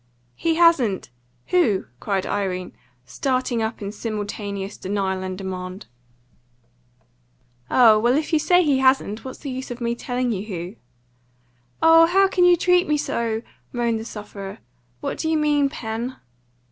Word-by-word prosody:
"He 330 - 0
hasn't! 275 - +3 0.4
Who?" 245 - +2
cried 195 +2 -1
Irene, 185 -3 -2 0.3
starting 255 - -1
up 220 -1 -3
in 200 - -4
simultaneous 205 -2 -5
denial 190 -1 -2
and 185 0 -4
demand. 185 0 -6 1.8
"Oh, 225 -4 +6
well, 240 +4 +3
if 310 +2 -3
you 315 - +5
say 360 +3 +4
he 285 -4 +2
hasn't, 260 -5 +2
what's 260 - -7
the 280 - -6
use 260 +1 -5
of 245 0 -6
my 235 -1 -1
telling 245 +1 -2
you 200 -1 -3
who?" 180 0 -6 1.1
"Oh, 330 0 +7
how 390 +3 +4
can 365 -2 +2
you 355 -1 +6
treat 360 +1 +3
me 300 - +2
so!" 230 -5 -2 0.3
moaned 235 -2 0
the 220 - -7
sufferer. 205 -3 -8 0.4
"What - - -4
do 320 - -1
you 320 - +2
mean, 295 -2 +2
Pen?" 235 -2 -5
235 Hz, 150 wpm, -23 LUFS, 200-295 Hz, 1.8 s, Oh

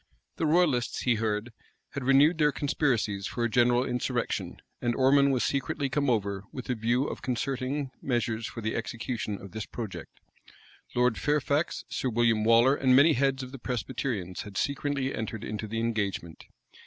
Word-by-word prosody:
The 160 - +1
royalists, 150 -7 +2
he 125 - +3
heard, 110 +1 -1 0.4
had 140 - -5
renewed 140 +6 +5
their 150 -1 +4
conspiracies 120 -9 0
for 120 +1 -3
a 120 - +1
general 120 +2 +3
insurrection; 125 -2 -2 0.2
and 120 -1 0
Ormond 140 +1 +4
was 130 -2 +1
secretly 140 0 -1
come 140 0 0
over 100 -4 0
with 130 0 -5
a - - +2
view 120 +3 +1
of - - -5
concerting 130 +2 -2
measures 115 -3 -1
for 115 - -7
the 110 0 -2
execution 115 -2 -3
of 100 - -11
this 110 +3 -5
project. 110 -5 -7 0.8
Lord 125 -2 +2
Fairfax, 150 +1 0
Sir 130 - -2
William 115 -2 +2
Waller, 115 +4 +5
and 130 -3 +3
many 150 +4 +7
heads 135 0 +1
of 130 - -8
the 135 - -9
Presbyterians, 115 -6 -3
had 100 -1 -8
secretly 140 -1 -1
entered 110 -1 -4
into 110 0 -4
the 115 +2 -3
engagement. 100 -7 -2
125 Hz, 165 wpm, -28 LUFS, 110-135 Hz, 0.8 s, many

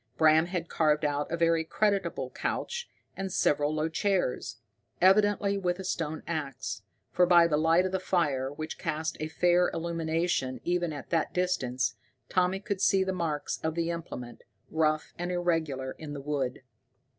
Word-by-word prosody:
Bram 160 +1 +5
had 175 -2 -3
carved 150 -2 +2
out 145 +1 -1
a 170 - 0
very 165 -1 +3
creditable 200 +4 0
couch, 480 0 -3 0.3
and 195 -1 -4
several 145 -3 +2
low 155 +1 0
chairs, 180 -5 -1 0.4
evidently 200 +1 +4
with 180 -2 0
a 190 - -6
stone 160 -4 -3
ax, 155 -6 -4 0.3
for 180 0 +4
by 170 -1 +7
the 165 -3 +2
light 165 +4 +4
of 185 - -1
the 190 - 0
fire, 145 -8 0
which 155 +2 -6
cast 155 +1 -2
a 155 - -2
fair 175 +2 +3
illumination 165 -5 -1
even 175 -1 0
at 145 -2 -8
that 165 -2 0
distance, 130 -9 0 0.3
Tommy 185 +1 +2
could 200 -1 -3
see 195 -1 +4
the 190 0 -1
marks 160 -5 -2
of 160 0 -2
the 170 0 0
implement, 125 -8 -7 0.3
rough 155 -1 +1
and 175 +1 -2
irregular, 160 -7 -1
in 150 -2 -6
the 140 - -6
wood. 135 -3 -2
165 Hz, 165 wpm, -29 LUFS, 150-180 Hz, 0.4 s, by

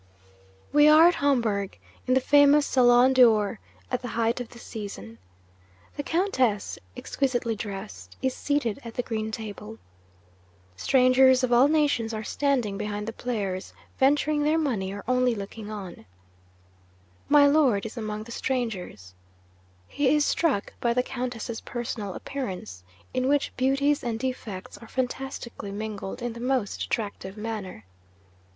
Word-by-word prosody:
'We 295 0 +6
are 310 +2 +8
at - - 0
Homburg, 230 - 0 0.3
in 255 - +3
the - - +5
famous 285 +2 +5
Salon 250 0 +5
d'Or, 220 -6 +4 0.3
at - - -1
the 250 - -5
height 230 +1 +1
of 245 - -6
the 240 - -14
season. 195 - -8 0.8
The 290 - -2
Countess 270 - 0 0.2
(exquisitely 245 -4 -1
dressed) 205 -1 -8
is 260 -1 0
seated 280 -6 -1
at 230 -1 -9
the 245 - -1
green 220 -2 -3
table. 220 0 -7 1.0
Strangers 255 - +4
of 245 -1 +2
all 245 +3 +6
nations 285 -7 +1
are 215 - -4
standing 245 -7 0
behind 210 0 -4
the 225 - -4
players, 205 -7 -4 0.3
venturing 295 +2 +3
their 305 +2 +2
money 230 -12 -1
or 205 +1 -7
only 250 -1 +2
looking 210 +1 -7
on. 195 - -8 1.2
My 290 -1 +7
Lord 280 -9 +3
is 225 - -6
among 215 -2 -4
the 235 - -11
strangers. 210 - -3 0.7
He 285 - +2
is 295 -1 +3
struck 280 -12 0
by 235 -1 +1
the 250 - +2
Countess's 245 -3 -5
personal 225 -5 -5
appearance, 180 - -6 0.3
in 255 0 0
which 285 0 +1
beauties 275 +3 +1
and 235 -2 -2
defects 225 -7 -5
are 230 - -12
fantastically 250 -4 -4
mingled 210 +2 -5
in 240 -1 -2
the 235 - -9
most 250 -4 -1
attractive 200 -2 -4
manner. 210 - -6
240 Hz, 145 wpm, -26 LUFS, 210-265 Hz, 1.2 s, are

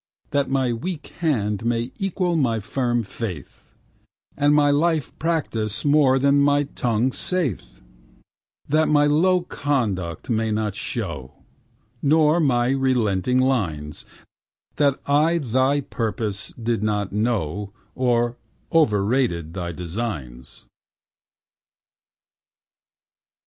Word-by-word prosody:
That 140 -1 +1
my 130 -3 +1
weak 155 +6 -5
hand 110 - 0
may 115 +1 -1
equal 185 -3 0
my 120 -8 +1
firm 120 +2 -1
faith 95 - -8 0.6
And 145 +1 +3
my 145 -1 +4
life 155 0 +1
practice 120 -10 -2
what 140 -3 +4
my 145 +1 +4
tongue 125 -3 -1
saith 170 - -2 0.9
That 155 +2 +2
my 145 -1 +4
low 180 +5 +3
conduct 115 - -2
may 110 -1 0
not 105 -1 -1
show 90 - -4 0.7
Nor 155 +2 +4
my 125 -6 +2
relenting 125 -5 +1
lines 90 - -1 0.7
That 140 -2 +2
I 155 +4 +3
thy 135 0 +1
purpose 110 -5 -3
did 115 -1 -1
not 105 -2 -1
know 105 -3 -1 0.2
Or 120 -2 +1 0.4
overrated 105 - +2
thy 85 -2 -4
designs. 80 - -6
120 Hz, 100 wpm, -23 LUFS, 105-145 Hz, 0.9 s, my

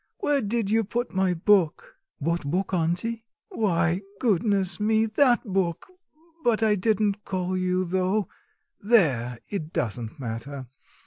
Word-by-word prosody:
where 290 -2 +1
did 215 -1 -1
you 225 0 +3
put 240 +4 -3
my 190 -1 +2
book?" 200 - +1 0.2
"What 170 +4 -1
book, 180 +7 -2
auntie?" 180 +7 -1 0.3
"Why, 180 - +1 0.2
goodness 200 -4 +1
me, 220 +1 +2
that 240 +3 +3
book! 190 - -2 0.5
But 225 -2 +2
I 215 -1 +4
didn't 210 0 0
call 185 -1 -2
you 185 0 0
though... 185 +2 0 0.5
There, 140 - +2
it 160 -6 -4
doesn't 115 - -3
matter. 130 +3 -5
190 Hz, 130 wpm, -25 LUFS, 170-220 Hz, 0.5 s, I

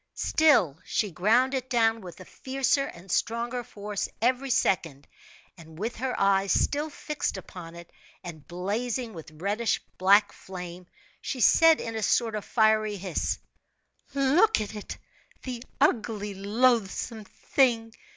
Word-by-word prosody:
Still 215 - +3
she 205 -3 -1
ground 230 - +2
it 260 -1 -3
down 225 -2 +2
with 180 -2 -10
a 185 - -10
fiercer 270 +4 0
and 175 +2 -11
stronger 235 +4 -1
force 205 -2 -5
every 255 +4 +1
second; 165 - 0 0.5
and 160 -1 -13
with 225 +6 -4
her 255 +2 -3
eyes 195 0 +3
still 295 +2 +1
fixed 300 0 -4
upon 170 -2 -10
it, 170 0 -12 0.3
and 160 -5 -9
blazing 220 +7 -3
with 160 -2 -10
reddish 200 +8 -1 0.2
black 200 +3 +5
flame, 180 -1 -9 0.3
she 265 - -4
said, 325 +7 +6
in 225 - -5
a 220 - -2
sort 225 +2 +1
of 210 -1 -3
fiery 215 -2 +2
hiss: 185 -3 -2 0.8
"Look 300 +11 +4
at 215 0 -4
it! 210 -1 -7 0.5
The 245 -2 -5 0.2
ugly, 220 -7 +1
loathsome 220 +1 0
thing! 230 0 0
215 Hz, 140 wpm, -27 LUFS, 190-250 Hz, 0.8 s, said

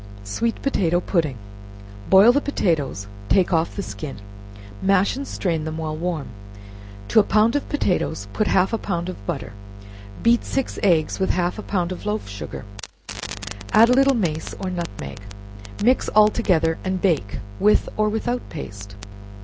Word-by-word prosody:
Sweet 225 - -2
Potato 175 -11 +2
Pudding. 160 - 0 0.7
Boil 195 +5 +8
the 285 +3 +2
potatoes, 160 - -1 0.2
take 185 -1 +3
off 165 0 +1
the 200 - -3
skin, 150 - -7 0.6
mash 195 +2 +3
and 275 +1 -5
strain 165 -5 -1
them 155 0 -4
while 155 -1 -3
warm; 165 -2 -3 0.8
to - - +5
a - - +6
pound 215 +5 +3
of 290 - -1
potatoes 180 - -1
put 215 - 0
half 190 +3 +2
a 225 - 0
pound 175 -2 -3
of 100 - -8
butter; - - -4 0.7
beat 235 0 +4
six 270 -2 -2
eggs 165 -5 +2
with 190 - +1
half 180 +3 0
a - - -3
pound 185 -4 -1
of 185 - -6
loaf 210 - -2
sugar, 100 +2 -7 1.1
add 225 +2 +7
a - - +5
little 275 +1 +4
mace 165 -8 -2
or 190 -1 -3
nutmeg; 100 - -5 0.6
mix 255 +4 +3
all 215 0 +6
together, 165 -8 +1
and 185 0 -1
bake 160 - 0 0.2
with 210 +1 +4
or 215 0 +2
without 240 +3 -1
paste. 100 -9 -8
185 Hz, 160 wpm, -22 LUFS, 160-215 Hz, 1.1 s, Boil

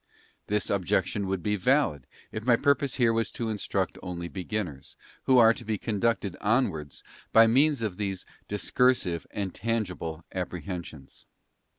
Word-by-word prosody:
This 105 -1 0
objection 95 +1 0
would 95 -2 -2
be 105 0 +1
valid, 100 - +1 0.2
if 110 - -5
my 120 0 +5
pur 140 +4 +4
pose 140 -1 -3
here 120 -3 +3
was 115 0 0
to 115 -2 -2
instruct 95 -3 -2
only 85 -2 -5
beginners, 90 -6 -5 0.3
who 130 - +5
are 115 -1 +7
to 120 - -10
be 110 -1 -2
conducted 105 -2 -1
onwards 100 - 0 0.3
by 115 0 +8
means 135 +3 +3
of 100 -5 -2
these 95 -3 -3 0.2
discursive 105 -4 +1
and 100 -3 -4
tangible 90 -8 -3
apprehensions. 85 -5 -6
105 Hz, 150 wpm, -28 LUFS, 90-115 Hz, 0.3 s, by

